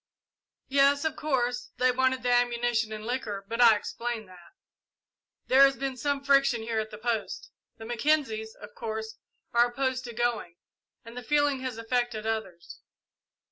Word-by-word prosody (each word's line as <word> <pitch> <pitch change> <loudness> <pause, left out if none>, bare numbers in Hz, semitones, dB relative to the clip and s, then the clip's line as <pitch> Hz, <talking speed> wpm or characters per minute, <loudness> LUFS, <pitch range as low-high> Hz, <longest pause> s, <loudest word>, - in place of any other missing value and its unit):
"Yes 280 +2 +3
of 315 0 -1
course 250 -5 -1
they 255 0 +3
wanted 260 0 +1
the 245 - +1
ammunition 240 -2 +1
and 215 0 -6
liquor, 210 -5 -4
but 230 +3 -1
I 230 -2 +8
explained 230 0 -4
that. 175 -2 -16 0.9
There 265 +1 +5
has 275 0 +6
been 270 -1 -3
some 280 +2 -2
friction 275 -4 +3
here 225 -1 -1
at 215 0 -3
the 210 - -9
post. 225 -1 -3 0.3
The 225 - -9
Mackenzies, 235 -3 0
of 210 - -11
course, 220 -1 -6 0.3
are 235 +1 +5
opposed 260 +1 -2
to 240 - -7
going, 230 -7 -2 0.5
and 230 +1 -11
the 250 - -5
feeling 290 +1 +1
has 255 -3 -5
affected 230 -1 -2
others. 190 -6 -5
240 Hz, 160 wpm, -28 LUFS, 220-260 Hz, 0.9 s, I